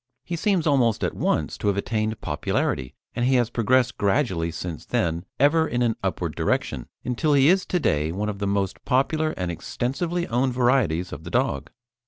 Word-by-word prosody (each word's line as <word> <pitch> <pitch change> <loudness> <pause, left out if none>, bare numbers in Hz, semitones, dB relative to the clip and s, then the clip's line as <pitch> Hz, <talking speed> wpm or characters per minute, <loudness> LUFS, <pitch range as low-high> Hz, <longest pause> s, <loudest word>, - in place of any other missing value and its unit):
He 175 - -3
seems 185 -1 +1
almost 130 -7 +2
at - - 0
once - - -1
to - - -2
have 100 -1 +2
attained 110 +1 -1
popularity, 65 -1 -1 0.2
and 120 - -1
he 130 +2 +3
has 120 -2 +2
progressed 125 +2 +2
gradually 100 - +1
since 85 -1 -6
then, 85 +1 -1
ever 160 +4 +4
in 120 -2 0
an 115 -2 +1
upward - - -2
direction, - - -1 0.2
until 125 +5 +1
he 140 +2 +5
is 190 +1 +3
to 180 - +1
day 75 - +1
one 100 +4 -2
of 100 -2 -4
the 100 - -1
most 100 -1 -1
popular 155 +5 +1
and 90 -2 -2
extensively 165 - -2
owned 125 0 0
varieties 120 - +1
of - - -8
the - - -7
dog. - - 0
120 Hz, 190 wpm, -24 LUFS, 100-140 Hz, 0.2 s, he